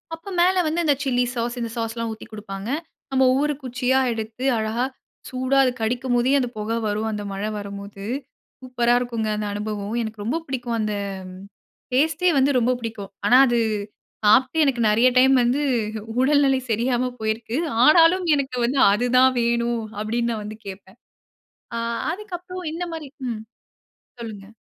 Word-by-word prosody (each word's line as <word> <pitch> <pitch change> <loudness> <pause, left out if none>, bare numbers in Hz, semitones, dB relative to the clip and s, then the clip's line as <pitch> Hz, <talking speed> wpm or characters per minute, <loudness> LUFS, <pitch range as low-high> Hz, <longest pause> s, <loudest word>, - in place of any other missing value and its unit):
அப்போ 330 +5 -11
மேல 365 +2 +4
வந்து 325 +3 0
இந்த 290 -2 +4
சில்லி 250 -2 +1
சாஸ், 240 +1 -2
இந்த 235 -1 -3
சாஸ்லாம் 230 0 -3
ஊத்தி 220 - -11
குடுப்பாங்க. 205 0 -6 0.4
நம்ம 265 0 +3
ஒவ்வொரு 290 +3 +1
குச்சியா 255 +1 +1
எடுத்து 225 +2 -5
அழகா, 220 +3 -1 0.4
சூடா 260 +1 0
அது 255 - +2
கடிக்கும்போதே 245 +2 +1
அந்த 250 -2 -1
புகை 215 +2 -2
வரும். 215 +2 -1
அந்த 210 -1 -4
மழை 200 +2 -3
வரும்போது, 200 -1 -8 0.6
சூப்பரா 245 -2 +1
இருக்குங்க 230 -3 -2
அந்த 210 0 -2
அனுபவம். 205 0 -4
எனக்கு 220 -2 -6
ரொம்ப 245 +9 0
பிடிக்கும். 245 -3 -3
அந்த 215 -1 -1 1.0
டேஸ்ட்டே 315 +6 +3
வந்து 270 +1 +4
ரொம்ப 245 +1 +2
பிடிக்கும். 220 -4 -6
ஆனா 245 +5 +6
அது, 240 -1 +2 0.7
சாப்ட்டு 255 +8 +4
எனக்கு 265 -5 +1
நிறைய 225 +4 +4
டைம் 265 +1 +6
வந்து 250 +5 +1 0.6
உடல்நிலை 270 0 +4
சரியாம 245 +3 +1
போயிருக்குது. 220 +6 -2 0.2
ஆனாலும் 335 +4 +6
எனக்கு 265 -3 -2
வந்து 260 +3 0
அதுதான் 250 +4 +4
வேணும். 235 0 0 0.2
அப்படின்னு 235 +2 -1
நான் 215 -2 -4
வந்து 215 +1 -7
கேப்பேன். 190 +2 -10 1.1
அதுக்கப்புறம் 365 -2 -7
இந்த 340 +2 -3
மாதிரி. 315 -3 -6 0.2
ம். 220 -2 -4 0.8
சொல்லுங்க. 210 -4 -7
240 Hz, 145 wpm, -23 LUFS, 220-265 Hz, 1.1 s, ஆனா